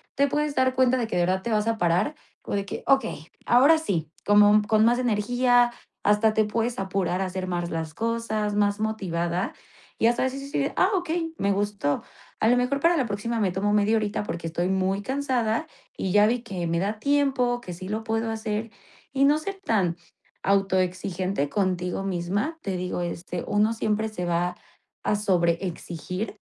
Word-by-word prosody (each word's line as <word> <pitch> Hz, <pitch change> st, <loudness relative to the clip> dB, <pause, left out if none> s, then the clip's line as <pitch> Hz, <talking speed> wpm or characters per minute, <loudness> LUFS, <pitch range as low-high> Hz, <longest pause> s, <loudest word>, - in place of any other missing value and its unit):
te 280 Hz, +1 st, +3 dB
puedes 295 Hz, +1 st, -1 dB
dar 260 Hz, 0 st, +3 dB
cuenta 260 Hz, 0 st, +3 dB
de 240 Hz, -, 0 dB
que -, -, -4 dB
de 175 Hz, -, +3 dB
verdad 185 Hz, +1 st, 0 dB
te 235 Hz, -, -2 dB
vas 215 Hz, 0 st, +1 dB
a 225 Hz, -1 st, +1 dB
parar, 175 Hz, -, +1 dB, 0.3 s
o -, -, -6 dB
de 200 Hz, -1 st, -1 dB
que: -, -, -6 dB
"Okey, 270 Hz, -, +1 dB, 0.2 s
ahora 275 Hz, +7 st, +6 dB
sí", 175 Hz, -, -2 dB, 0.2 s
como 205 Hz, 0 st, +6 dB
con 215 Hz, +1 st, +4 dB
más 240 Hz, +2 st, +4 dB
energía, 245 Hz, +1 st, +3 dB, 0.3 s
hasta 210 Hz, +1 st, +3 dB
te 215 Hz, -1 st, +3 dB
puedes 230 Hz, +2 st, -1 dB
apurar, 190 Hz, -1 st, -1 dB
a -, -, 0 dB
hacer 185 Hz, 0 st, -4 dB
más 175 Hz, -1 st, -2 dB
las 160 Hz, -1 st, -4 dB
cosas, 220 Hz, -1 st, -1 dB
más 205 Hz, 0 st, +2 dB
motivada 185 Hz, -3 st, -2 dB, 0.4 s
y 225 Hz, -, +3 dB
hasta 240 Hz, +2 st, +2 dB
eso 260 Hz, +1 st, -2 dB
vas -, -, -6 dB
a 275 Hz, -, -7 dB
decir: 280 Hz, 0 st, -1 dB
"Ah, 370 Hz, -, +4 dB
okey, 330 Hz, -2 st, -2 dB
me 200 Hz, -, +1 dB
gustó". 200 Hz, -7 st, -1 dB, 0.4 s
A 220 Hz, -, +4 dB
lo 245 Hz, -, +4 dB
mejor 250 Hz, +3 st, +1 dB
para 335 Hz, +3 st, +3 dB
la 265 Hz, -, +1 dB
próxima 220 Hz, +3 st, -2 dB
me 195 Hz, -4 st, +1 dB
tomo 205 Hz, +3 st, 0 dB
media 210 Hz, +2 st, +3 dB
horita 210 Hz, -1 st, -1 dB
porque 170 Hz, -4 st, -5 dB
estoy 175 Hz, +2 st, -1 dB
muy 190 Hz, +1 st, 0 dB
cansada, 250 Hz, -2 st, -1 dB, 0.3 s
y 190 Hz, -, -2 dB
ya 210 Hz, +1 st, +5 dB
vi 240 Hz, +1 st, 0 dB
que 185 Hz, -6 st, -4 dB
me 170 Hz, 0 st, 0 dB
da 205 Hz, +3 st, -2 dB
tiempo, 270 Hz, -3 st, +1 dB
que 180 Hz, -, -7 dB
sí 185 Hz, +2 st, -8 dB
lo 215 Hz, +1 st, -2 dB
puedo 225 Hz, 0 st, -1 dB
hacer 220 Hz, 0 st, -3 dB, 0.4 s
y 275 Hz, 0 st, +2 dB
no 295 Hz, +2 st, +5 dB
ser 390 Hz, +5 st, -6 dB
tan 190 Hz, -, +1 dB, 0.5 s
autoexigente 185 Hz, -4 st, 0 dB
contigo 185 Hz, -2 st, -1 dB
misma, 195 Hz, -, -2 dB
te 190 Hz, -2 st, -3 dB
digo 180 Hz, 0 st, -3 dB
este, 175 Hz, 0 st, -4 dB
uno 210 Hz, +2 st, +2 dB
siempre 220 Hz, 0 st, -1 dB
se 180 Hz, -4 st, -4 dB
va 175 Hz, +1 st, 0 dB, 0.5 s
a -, -, +1 dB
sobre 175 Hz, -5 st, +2 dB
exigir, 180 Hz, +3 st, -5 dB
210 Hz, 195 wpm, -25 LUFS, 185-240 Hz, 0.5 s, ahora